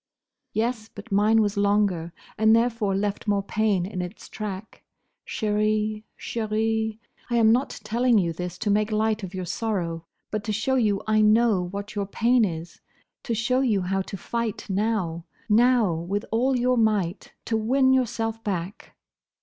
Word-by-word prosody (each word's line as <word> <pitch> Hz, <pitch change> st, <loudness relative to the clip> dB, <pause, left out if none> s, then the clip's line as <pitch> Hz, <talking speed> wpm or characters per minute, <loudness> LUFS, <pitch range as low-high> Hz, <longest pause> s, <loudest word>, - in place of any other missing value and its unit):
"Yes; 225 Hz, 0 st, -2 dB
but 205 Hz, +2 st, -11 dB
mine 215 Hz, +2 st, +4 dB
was 205 Hz, 0 st, -2 dB
longer 200 Hz, -5 st, +1 dB, 0.2 s
and 220 Hz, +1 st, +5 dB
therefore 230 Hz, -4 st, +1 dB
left 205 Hz, +2 st, -2 dB
more 200 Hz, -1 st, +1 dB
pain 205 Hz, -3 st, +1 dB
in 185 Hz, -1 st, -4 dB
its 180 Hz, +4 st, -8 dB
track. 210 Hz, -1 st, -6 dB, 0.5 s
Chérie, 215 Hz, 0 st, 0 dB
chérie, 220 Hz, 0 st, -1 dB, 0.3 s
I 240 Hz, -, 0 dB
am 225 Hz, -1 st, +5 dB
not 250 Hz, +4 st, 0 dB
telling 235 Hz, +2 st, +2 dB
you 170 Hz, -4 st, +1 dB
this 180 Hz, +1 st, -5 dB
to 210 Hz, -, -1 dB
make 210 Hz, +1 st, +1 dB
light 215 Hz, 0 st, +1 dB
of 190 Hz, -1 st, -7 dB
your 185 Hz, -1 st, -3 dB
sorrow, 170 Hz, -5 st, -2 dB, 0.3 s
but 215 Hz, -1 st, -2 dB
to 215 Hz, -, -1 dB
show 225 Hz, +5 st, 0 dB
you 215 Hz, -6 st, +1 dB
I 215 Hz, 0 st, +3 dB
know 215 Hz, -3 st, +4 dB
what 200 Hz, +3 st, -6 dB
your 200 Hz, -2 st, -2 dB
pain 235 Hz, +4 st, +3 dB
is: 170 Hz, -3 st, -4 dB, 0.4 s
to 235 Hz, -, -2 dB
show 240 Hz, +4 st, +1 dB
you 225 Hz, -7 st, +2 dB
how 195 Hz, +1 st, 0 dB
to 195 Hz, +1 st, -6 dB
fight 230 Hz, +3 st, -3 dB
now, 190 Hz, -5 st, -1 dB, 0.2 s
now, 230 Hz, -3 st, +4 dB
with 180 Hz, +6 st, -3 dB
all 250 Hz, +4 st, +2 dB
your 250 Hz, 0 st, +2 dB
might, 210 Hz, -5 st, 0 dB
to 225 Hz, -, -1 dB
win 260 Hz, +4 st, +3 dB
yourself 225 Hz, -3 st, -1 dB
back." 190 Hz, -1 st, -4 dB
215 Hz, 165 wpm, -25 LUFS, 195-225 Hz, 0.5 s, and